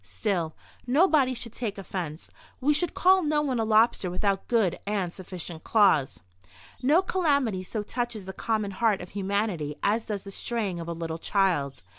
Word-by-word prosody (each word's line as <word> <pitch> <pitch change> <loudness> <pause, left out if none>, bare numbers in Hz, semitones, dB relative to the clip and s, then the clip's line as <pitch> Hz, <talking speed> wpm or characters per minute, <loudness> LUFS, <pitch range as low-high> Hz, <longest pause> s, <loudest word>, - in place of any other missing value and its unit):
Still, 160 - -2 0.3
nobody 280 -2 +4
should 230 -1 -7
take 225 -5 -4
offence. 180 -5 -6 0.3
We 290 +3 +3
would 350 - -2
call 375 +1 +5
no 300 -2 +1
one 260 -5 -1
a - - +2
lobster 220 -3 +3
without 195 +2 -1
good 215 -7 +2
and 195 -4 -1
sufficient 175 -3 -7
claws. 180 -11 +3 0.6
No 300 +8 +4
calamity 285 - +1
so 205 +3 -4
touches 240 -2 -4
the 190 - -6
common 215 -1 -1
heart 205 0 +1
of 180 - -9
humanity 195 -6 -2
as 220 +2 +1
does 205 -3 -3
the 195 - -8
straying 205 -4 -2
of 165 - -6
a 170 - -2
little 165 -1 -5
child. 170 - 0
205 Hz, 170 wpm, -27 LUFS, 180-240 Hz, 0.6 s, call